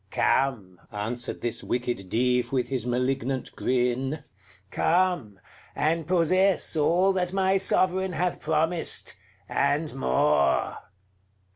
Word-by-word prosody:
"Come!" 110 Hz, -10 st, 0 dB
answered 115 Hz, +4 st, -3 dB
this 120 Hz, -1 st, -2 dB
wicked 120 Hz, -6 st, -3 dB
Dive, 125 Hz, +2 st, +1 dB
with 130 Hz, -2 st, -1 dB
his 125 Hz, -3 st, -1 dB
malignant 130 Hz, +1 st, -2 dB
grin, 130 Hz, +4 st, -1 dB, 0.5 s
"come! 175 Hz, -, 0 dB, 0.4 s
and 160 Hz, +1 st, 0 dB
possess 185 Hz, +2 st, +2 dB
all 175 Hz, +5 st, +3 dB
that 180 Hz, -1 st, -1 dB
my 190 Hz, 0 st, +2 dB
Sovereign 190 Hz, -1 st, +1 dB
hath 175 Hz, +1 st, -1 dB
promised, 160 Hz, +2 st, 0 dB, 0.3 s
and 150 Hz, +2 st, 0 dB
more." 70 Hz, +3 st, +1 dB
135 Hz, 105 wpm, -26 LUFS, 120-175 Hz, 0.5 s, all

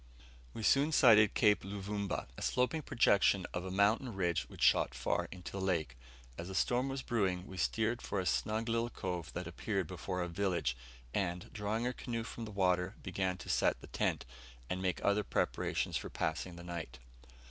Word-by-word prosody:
We 110 Hz, -, -5 dB
soon 140 Hz, +7 st, +4 dB
sighted 110 Hz, -8 st, +6 dB
Cape 105 Hz, -3 st, +4 dB
Luvumba 100 Hz, 0 st, -3 dB
a -, -, -9 dB
sloping 125 Hz, +6 st, +1 dB
projection 100 Hz, -7 st, +3 dB
of 90 Hz, -, -2 dB
a 95 Hz, -, -5 dB
mountain 105 Hz, +5 st, +2 dB
ridge 85 Hz, -4 st, 0 dB
which -, -, -5 dB
shot -, -, +4 dB
far -, -, 0 dB
into 90 Hz, -2 st, -8 dB
the 95 Hz, -, -4 dB
lake. 85 Hz, -9 st, 0 dB, 0.4 s
As 85 Hz, +2 st, -5 dB
a 95 Hz, -, -5 dB
storm 125 Hz, +6 st, +2 dB
was 135 Hz, -1 st, -3 dB
brewing, 95 Hz, -6 st, 0 dB
we 95 Hz, -, -9 dB
steered 110 Hz, +7 st, 0 dB
for 100 Hz, -, -2 dB
a 95 Hz, -, -2 dB
snug 110 Hz, +4 st, 0 dB
little 115 Hz, +1 st, +1 dB
cove 90 Hz, -7 st, -4 dB
that 90 Hz, -, -4 dB
appeared 95 Hz, +3 st, -2 dB
before 90 Hz, +2 st, -3 dB
a -, -, -2 dB
village; 85 Hz, -8 st, 0 dB, 0.4 s
and, 90 Hz, -2 st, -2 dB
drawing 110 Hz, +2 st, -1 dB
our 125 Hz, -, 0 dB
canoe 115 Hz, -2 st, -4 dB
from 115 Hz, 0 st, -6 dB
the 110 Hz, -, -8 dB
water, 90 Hz, 0 st, +1 dB
began 95 Hz, -1 st, -1 dB
to -, -, -10 dB
set -, -, +2 dB
the -, -, -11 dB
tent, -, -, -1 dB, 0.5 s
and 90 Hz, -, -1 dB
make 90 Hz, -1 st, 0 dB
other 100 Hz, +1 st, +3 dB
preparations -, -, 0 dB
for -, -, -5 dB
passing 85 Hz, +2 st, -2 dB
the 85 Hz, -, -9 dB
night. 85 Hz, -7 st, -6 dB
95 Hz, 190 wpm, -34 LUFS, 90-110 Hz, 0.5 s, sighted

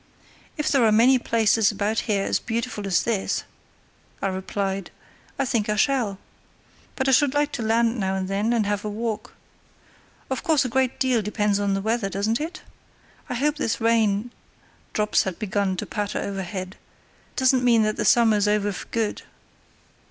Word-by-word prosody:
"If 300 Hz, 0 st, -1 dB
there 270 Hz, -4 st, +4 dB
are 220 Hz, -, +4 dB
many 245 Hz, +4 st, +5 dB
places 225 Hz, -2 st, +2 dB
about 210 Hz, +2 st, -1 dB
here 200 Hz, -2 st, +2 dB
as -, -, +1 dB
beautiful 225 Hz, -3 st, -3 dB
as 185 Hz, -, +2 dB
this," 220 Hz, -5 st, -1 dB, 0.8 s
I 195 Hz, -, -1 dB
replied, 190 Hz, 0 st, -3 dB, 0.5 s
"I 275 Hz, -, 0 dB
think 230 Hz, -5 st, 0 dB
I 210 Hz, -, +1 dB
shall. 230 Hz, -5 st, +1 dB, 0.8 s
But 265 Hz, -, -1 dB
I -, -, +4 dB
should 280 Hz, +1 st, +3 dB
like 295 Hz, 0 st, +1 dB
to 245 Hz, -, -4 dB
land 230 Hz, +1 st, +1 dB
now 190 Hz, -1 st, 0 dB
and 190 Hz, -1 st, -2 dB
then 200 Hz, +4 st, 0 dB
and 230 Hz, -3 st, +1 dB
have 205 Hz, 0 st, -1 dB
a 210 Hz, -, -3 dB
walk. 220 Hz, +1 st, -4 dB, 1.0 s
Of 265 Hz, -, -1 dB
course, 305 Hz, -5 st, +2 dB
a -, -, -1 dB
great 260 Hz, +1 st, 0 dB
deal 255 Hz, -4 st, +2 dB
depends 210 Hz, -1 st, 0 dB
on 200 Hz, -1 st, 0 dB
the 195 Hz, -, -2 dB
weather, 220 Hz, -1 st, -1 dB
doesn't 210 Hz, +6 st, -1 dB
it? 325 Hz, +3 st, -6 dB, 0.7 s
I -, -, -2 dB
hope 295 Hz, +4 st, 0 dB
this 230 Hz, -7 st, -1 dB
rain" 225 Hz, -1 st, +2 dB, 0.6 s
(drops 210 Hz, 0 st, +2 dB
had 190 Hz, -3 st, -4 dB
begun 200 Hz, -2 st, -1 dB
to -, -, -3 dB
patter 205 Hz, -1 st, -3 dB
overhead) 190 Hz, -1 st, -5 dB, 0.6 s
"doesn't 260 Hz, -1 st, +3 dB
mean 235 Hz, -3 st, +4 dB
that 215 Hz, 0 st, 0 dB
the -, -, 0 dB
summer's 220 Hz, -3 st, +4 dB
over 205 Hz, 0 st, +1 dB
for 190 Hz, -, -8 dB
good." 225 Hz, -2 st, -2 dB
220 Hz, 175 wpm, -24 LUFS, 200-245 Hz, 1.0 s, many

